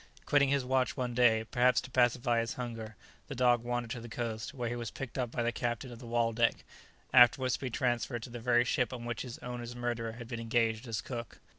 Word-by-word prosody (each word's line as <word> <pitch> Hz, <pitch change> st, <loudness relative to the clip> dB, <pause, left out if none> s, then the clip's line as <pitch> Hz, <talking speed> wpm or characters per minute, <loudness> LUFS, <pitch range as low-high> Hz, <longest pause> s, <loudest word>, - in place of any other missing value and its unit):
Quitting 140 Hz, -1 st, +4 dB
his 140 Hz, -2 st, +1 dB
watch 130 Hz, +1 st, +1 dB
one 125 Hz, -2 st, -2 dB
day, 115 Hz, -2 st, +4 dB
perhaps 125 Hz, +2 st, +3 dB
to 125 Hz, -, -8 dB
pacify 120 Hz, -1 st, +3 dB
his 115 Hz, 0 st, -2 dB
hunger, 115 Hz, -3 st, -6 dB, 0.3 s
the 135 Hz, -, -6 dB
dog 120 Hz, -2 st, +3 dB
wandered 120 Hz, -1 st, -2 dB
to 120 Hz, -, -4 dB
the 120 Hz, -, -9 dB
coast, 110 Hz, +1 st, -4 dB
where 125 Hz, -5 st, -4 dB
he 120 Hz, -, -2 dB
was 120 Hz, -2 st, -4 dB
picked 135 Hz, 0 st, -7 dB
up 125 Hz, -3 st, -1 dB
by 120 Hz, +1 st, -2 dB
the 120 Hz, -, +1 dB
captain 120 Hz, +1 st, -3 dB
of 120 Hz, -, -10 dB
the 120 Hz, -, -10 dB
"Waldeck," 115 Hz, 0 st, +1 dB, 0.5 s
afterwards 125 Hz, +1 st, +6 dB
to -, -, -1 dB
be 130 Hz, -, -3 dB
transferred 120 Hz, -1 st, -1 dB
to 120 Hz, -, -8 dB
the 120 Hz, -, -6 dB
very 120 Hz, 0 st, +3 dB
ship 125 Hz, +1 st, +1 dB
on 120 Hz, -2 st, -6 dB
which 120 Hz, -1 st, -3 dB
his 125 Hz, -2 st, -6 dB
owner's 120 Hz, -1 st, -5 dB
murderer 120 Hz, -2 st, -2 dB
had 115 Hz, 0 st, -9 dB
been 115 Hz, -1 st, -5 dB
engaged 115 Hz, 0 st, 0 dB
as 110 Hz, -2 st, -2 dB
cook. 120 Hz, -4 st, -7 dB
120 Hz, 235 wpm, -32 LUFS, 115-125 Hz, 0.5 s, afterwards